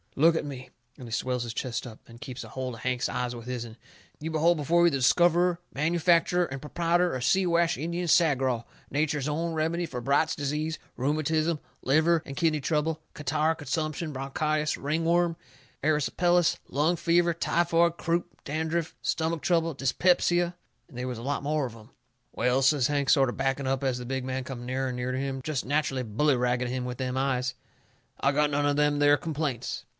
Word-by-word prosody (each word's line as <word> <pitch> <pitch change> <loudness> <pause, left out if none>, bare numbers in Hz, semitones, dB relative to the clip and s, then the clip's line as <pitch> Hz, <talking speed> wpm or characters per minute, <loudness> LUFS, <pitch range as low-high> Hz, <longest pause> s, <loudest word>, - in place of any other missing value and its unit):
Look 165 +4 +5
at - - 0
me," 135 -3 -7 0.3
and 125 - -9
he - - -10
swells 125 +1 -1
his 120 -1 -5
chest 120 +1 -3
up, 110 -2 -11
and 115 0 -14
keeps 130 0 -7
a - - -11
holt 130 -1 -4
of 115 - -10
Hank's 125 0 0
eyes 125 -1 -2
with 115 -1 -9
his'n. 120 -2 -5 0.4
"You 155 - -4
behold 160 +2 +3
before 170 +4 +3
you - - +6
the 140 - 0
discoverer, 175 +6 +3
manufacturer, 170 +3 +2
and 135 -3 -6
proprietor 170 +3 +1
of 125 - -3
Siwash 170 +2 +2
Indian 170 +4 -3
Sagraw, 135 -8 +3 0.2
nature's 145 0 0
own 165 +3 -1
remedy 165 +2 0
for 125 -6 -6
Bright's 140 +5 +2
Disease, 150 +3 -2 0.2
rheumatism, 155 +4 0 0.2
liver 160 +4 +3
and 140 - -7
kidney 160 -2 +1
trouble, 155 +2 0
catarrh, 155 +2 0
consumption, 155 +2 -3
bronchitis, 150 +3 -1
ring 155 +4 -2
worm, 170 0 +2 0.5
erysipelas, 165 +3 +2
lung 155 +5 +1
fever, 170 +1 +3
typhoid, 170 0 +2
croup, 170 +1 0 0.2
dandruff, 160 +2 -2
stomach 160 0 -1
trouble, 165 -2 +1
dyspepsia 175 +5 +2 0.2
" - - -43
And 125 - -13
they 125 - -3
was 125 -3 -4
a - - -8
lot 140 +2 -2
more 150 0 0
of 120 -3 -7
'em. 115 +3 -15 0.4
"Well," 125 +3 +1
says 135 -2 +4
Hank, 145 -2 0
sort 135 -4 +5
o' - - -3
backing 135 0 -1
up 135 0 0
as 130 -2 0
the 125 - -6
big 130 +1 -3
man 130 0 -3
come 125 -2 -7
nearer 130 +1 -1
and 125 - -4
nearer 125 +1 -2
to - - -1
him, 135 -1 -3
jest 140 -1 -3
natcherally 140 -2 0
bully 130 +6 +1
ragging 125 0 0
him 125 +1 -2
with 125 -1 -5
them 130 0 -2
eyes, 130 -1 0 0.7
"I 140 - +2
got 150 +1 +3
none 145 0 0
of 145 0 +2
them 145 0 +2
there 145 0 +6
complaints." 145 -6 -3
145 Hz, 195 wpm, -27 LUFS, 130-165 Hz, 0.7 s, you